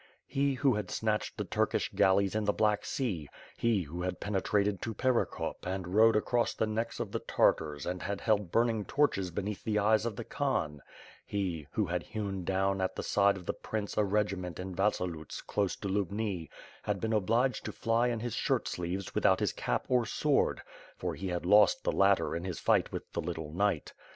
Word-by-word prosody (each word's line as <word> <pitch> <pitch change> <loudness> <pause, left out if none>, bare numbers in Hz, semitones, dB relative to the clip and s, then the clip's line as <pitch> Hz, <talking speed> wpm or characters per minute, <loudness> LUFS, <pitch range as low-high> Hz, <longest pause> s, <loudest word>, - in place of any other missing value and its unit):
He, 140 0 0
who 135 0 +3
had 105 -3 -3
snatched 110 -1 -1
the - - -1
Turkish - - 0
galleys 95 0 +3
in 110 0 0
the 105 - +2
Black 105 -1 +1
Sea; 95 - -2 0.3
he, 115 -5 +1
who 85 +3 -6
had 90 0 -3
penetrated 100 0 0
to 115 -1 -4
Perekop 130 +1 0
and 90 -1 -4
role 110 +1 +6
across 120 +2 +1
the - - +1
necks 110 +2 -2
of - - -3
the - - -1
Tartars 75 -3 +1
and 90 0 -3
had 100 +2 -3
held 105 -5 +1
burning 115 -2 +2
torches 120 -11 +1
beneath 100 +3 -4
the 110 -1 0
eyes 110 +2 +3
of 110 - -4
the 120 - -5
Khan; 80 - -1 0.4
he, 90 -7 -3
who 105 - +1
had 90 0 -1
hewn 100 -3 -4
down 95 +1 +1
at 95 - -1
the - - -4
side 100 -1 +3
of 90 - -10
the - - -1
prince 105 -2 -4
a 105 - +3
regiment 100 -4 -1
in 95 0 -5
Vasi 100 -1 +1
loots 80 -3 -6
close 100 -2 -1
to 100 - -6
Lubni, 100 -3 -2 0.3
had 105 -1 -2
been 110 +2 -1
obliged 115 +4 +1
to - - -3
fly 115 +2 +1
in 120 -2 -1
his 120 -2 -3
shirt - - 0
sleeves 90 +2 -3
without - - +3
his - - 0
cap - - -1
or 125 -3 +2
sword 145 +2 +1 0.2
— - - -21
for - - -2
he 95 - -5
had 90 -1 -2
lost 105 +3 +5
the - - +1
latter 100 0 +3
in 85 - -3
his 90 -3 -4
fight - - +2
with - - -6
the - - -1
little 80 -2 -5
knight. 100 -4 0
100 Hz, 205 wpm, -31 LUFS, 90-110 Hz, 0.4 s, role